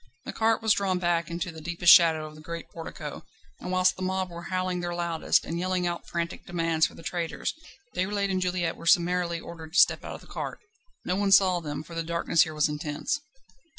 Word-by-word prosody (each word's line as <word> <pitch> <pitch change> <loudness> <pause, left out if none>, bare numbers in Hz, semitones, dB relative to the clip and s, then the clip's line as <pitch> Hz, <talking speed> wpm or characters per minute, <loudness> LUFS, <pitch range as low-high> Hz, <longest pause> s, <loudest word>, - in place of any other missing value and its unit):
The - - -5
cart 225 0 +1
was 220 -2 +5
drawn 195 -2 0
back 175 -2 0
into 170 +1 -3
the 160 -1 -10
deepest 175 +2 +6
shadow 160 -2 +5
of 155 - -9
the 155 - -13
great 170 +1 -7
portico, 165 -1 -7 0.4
and 180 - -5
whilst 185 0 +3
the - - -8
mob 185 -1 -1
were 170 0 -8
howling 185 -1 -1
their 175 0 -3
loudest, 170 -2 +1
and 170 +1 -3
yelling 185 0 0
out 175 0 -3
frantic 170 -1 -3
demands 165 -2 +1
for - - -15
the - - -12
traitors, 165 +1 -3 0.4
Déroulède 200 +2 0
and 185 -1 0
Juliette 180 -2 -1
were 165 - -8
summarily 175 -1 +3
ordered 160 -2 -10
to 185 - +4
step 175 - +5
out - - -6
of - - -11
the - - -16
cart. - - -5 0.5
No 180 - 0
one 200 0 +1
saw 190 -2 +6
them, 150 -2 -5
for 170 - -12
the 165 - -2
darkness 170 0 +1
here 155 -1 -7
was 150 0 +3
intense. 150 - -3
175 Hz, 220 wpm, -27 LUFS, 165-185 Hz, 0.5 s, deepest